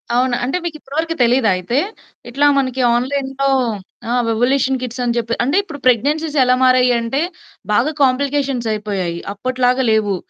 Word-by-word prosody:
అవునా! 250 0 +2
అంటే 270 +8 -1
మీకిప్పటి 305 -4 -7
వరకు 330 0 -2
తెలీదా 240 -2 +3
అయితే? 210 +9 -2 0.5
ఇట్లా 280 +4 +1
మనకి 260 -1 0
ఆన్‌లైన్‌లో 270 +2 -1 0.6
ఆ! - - -1 0.2
వివోల్యూషన్ 260 +3 +1
కిట్స్ 250 0 -5
అని 240 -1 0
జెప్పి. 235 0 -1
అంటే 275 +8 +1
ఇప్పుడు 300 -7 -9
ప్రెగ్నెన్సీస్ 290 +6 +1
ఎలా 250 0 +3
మారాయి 255 -1 +4
అంటే 235 +6 -2 0.5
బాగా 240 +8 +2
కాంప్లికేషన్స్ 270 -2 0
అయిపోయాయి. 200 -5 -3 0.2
అప్పటిలాగా 255 +3 0
లేవు. 210 -3 +1
255 Hz, 145 wpm, -18 LUFS, 235-275 Hz, 0.6 s, మారాయి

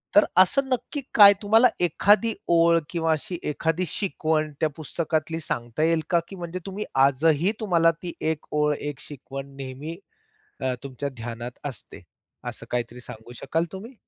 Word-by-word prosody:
तर 205 - +8
असं 190 +9 +5
नक्की 265 +3 -2
काय 205 -2 +10
तुम्हाला 220 +4 +6 0.2
एखादी 210 +7 +3 0.2
ओळ 170 0 +5
किंवा 165 -2 0
अशी 160 +3 -2
एखादी 160 +4 -1
शिकवण 155 -4 -1
त्या 155 - +2
पुस्तकातली 160 +1 -2
सांगता 120 0 -3
येईल 165 0 +3
का? 170 - +4
की 195 - -9
म्हणजे 175 0 -5
तुम्ही 200 +2 -5 0.2
आजही 155 +6 +2
तुम्हाला 170 -6 +3
ती 175 -2 -5 0.2
एक 155 - -6
ओळ, 150 0 +2
एक 145 -1 -5
शिकवण 135 -1 -8
नेहमी 135 +5 -7 0.6
अ, 130 -1 0
तुमच्या 140 +1 -4
ध्यानात 120 +1 -6
असते. 135 -7 -8 0.5
असं - - -6
काहीतरी 120 0 -3
सांगू 115 0 -11
शकाल 165 +7 -1
तुम्ही? 215 +7 -9
160 Hz, 155 wpm, -25 LUFS, 140-185 Hz, 0.6 s, काय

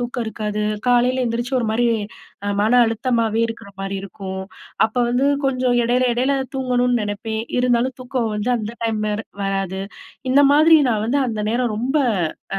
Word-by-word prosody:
தூக்கம் 245 0 -3
இருக்காது. 210 -1 -3 0.3
காலைல 250 +1 +3
எந்திரிச்சு 240 +3 -2
ஒரு 230 - -1
மாரி 240 +2 +2 0.6
அ - - 0
மன 220 - +2
அழுத்தமவே 230 -1 0
இருக்குற 225 -3 -8
மாரி 195 0 -3
இருக்கும். 190 -1 -6 0.4
அப்ப 225 - -18
வந்து 250 +3 +2 0.2
கொஞ்சம் 255 -2 +1
எடைல, 245 +2 +2
எடைல 260 +3 +1 0.2
தூங்கணுன் 250 -1 +1
நெனப்பேன். 220 +2 -3 0.2
இருந்தாலும் 250 +1 +1
தூக்கம் 245 -3 -2
வந்து 210 +4 -1
அந்த 215 0 -5
டைம் 220 -1 -1
வேற 210 +1 -2 0.2
வராது. 195 -1 -2 0.5
இந்த 280 +2 +5
மாதிரி 315 +2 +7
நான் 215 -1 0
வந்து 280 +4 +1
அந்த 220 -3 -3
நேரம் 240 0 0
ரொம்ப, 255 +4 -2 0.6
அ - - -2
235 Hz, 160 wpm, -21 LUFS, 215-250 Hz, 0.6 s, மாதிரி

